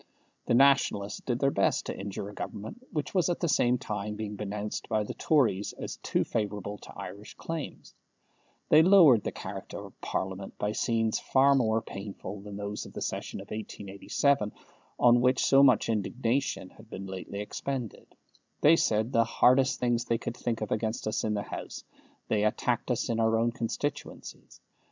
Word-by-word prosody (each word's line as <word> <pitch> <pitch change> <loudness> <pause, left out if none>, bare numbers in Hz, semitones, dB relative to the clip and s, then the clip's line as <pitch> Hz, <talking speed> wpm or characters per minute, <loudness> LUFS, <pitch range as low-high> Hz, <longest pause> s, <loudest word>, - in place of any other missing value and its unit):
The - - +3
Nationalists 130 -6 +3
did 120 -2 -1
their 135 +2 +2
best - - +1
to - - -4
injure 100 0 -5
a 105 - -9
Government 210 - -7
which 150 -3 -3
was 180 -3 +2
at 175 - -1
the 170 - 0
same 125 -5 +3
time 105 -2 -4
being 105 -1 -5
denounced 105 +1 -4
by 110 -1 +1
the - - -5
Tories 115 -10 +1
as - - -6
too - - 0
favourable 105 -2 -3
to - - -12
Irish 100 +2 -8
claims; 165 -3 -6 0.8
they 155 - +8
lowered 165 - +7
the - - -2
character - - -7
of - - -16
Parliament 95 +1 -4
by 105 - -1
scenes 115 0 0
far 140 +1 +4
more 115 -4 +2
painful 100 0 -7
than 100 0 -8
those 105 0 -5
of - - -14
the - - -6
session - - -4
of - - -13
1887, 105 +3 -1 0.5
on 120 0 +5
which 125 +1 +3
so 135 0 +6
much 130 -5 +5
indignation 115 0 -1
has 110 - -16
been 95 -3 -7
lately 95 +1 -6
expended; 120 +3 -5 0.5
they 155 +3 +7
said 110 -5 +1
the 115 - +4
hardest 130 +3 +3
things 120 -1 +1
they 115 - +1
could 115 0 -5
think 115 -2 -3
of 110 - -3
against 110 +1 -1
us 110 0 -1
in 110 -1 0
the 100 - -2
House; - - -7 0.4
they 105 -1 +1
attacked 120 +3 0
us 125 - 0
in 115 -2 -1
our 115 +1 +2
constituencies. 145 +6 -5
115 Hz, 175 wpm, -29 LUFS, 105-130 Hz, 0.8 s, they